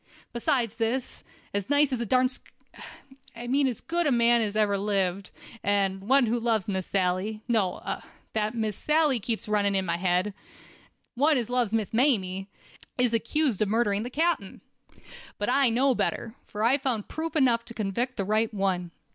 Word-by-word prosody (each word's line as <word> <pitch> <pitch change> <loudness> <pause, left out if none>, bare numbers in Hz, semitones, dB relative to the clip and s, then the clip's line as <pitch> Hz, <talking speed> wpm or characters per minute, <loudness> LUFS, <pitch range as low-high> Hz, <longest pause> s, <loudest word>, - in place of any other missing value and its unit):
Besides 235 -2 0
this, 240 +3 -2 0.3
as 200 +1 -2
nice 290 -1 +3
a 240 -2 -1
darn 255 +3 +4
sk— 255 - -8 0.8
I 235 +1 -7
mean 270 +3 +2
as 245 -4 -3
good 340 0 0
a - - +2
man 235 -1 +4
as 210 -2 -2
ever 210 -2 +2
lived, 195 -2 0 0.3
and 195 -1 +1
one 260 +6 +4
who 235 +2 0
loves 225 -4 0
Miss 190 -3 -2
Sally—no—that 210 +2 -2
Miss 220 -3 -1
Sally 300 -2 +2
keeps 225 +1 -3
running 205 -1 +1
in 190 -1 +1
my 170 - -1
head—one 205 - -2
as 245 -1 -3
loves 245 -4 +1
Miss 220 -3 -1
Mamie, 195 -7 +1 0.5
is 250 -2 +2
accused 235 0 +1
of 215 - +3
murdering 210 -2 +1
the 240 - -4
captain. 315 - -1 0.8
But 205 - -2
I 270 -1 +4
know 260 +4 +3
better, 225 -1 -2
for 210 0 -4
I 260 +5 +4
found 250 -6 -2
proof 320 0 -5
enough 245 -6 +3
to 235 - -11
convict 235 +5 -2
the 195 - -1
right 215 +2 +1
one. 190 -4 -1
225 Hz, 165 wpm, -27 LUFS, 200-255 Hz, 0.8 s, darn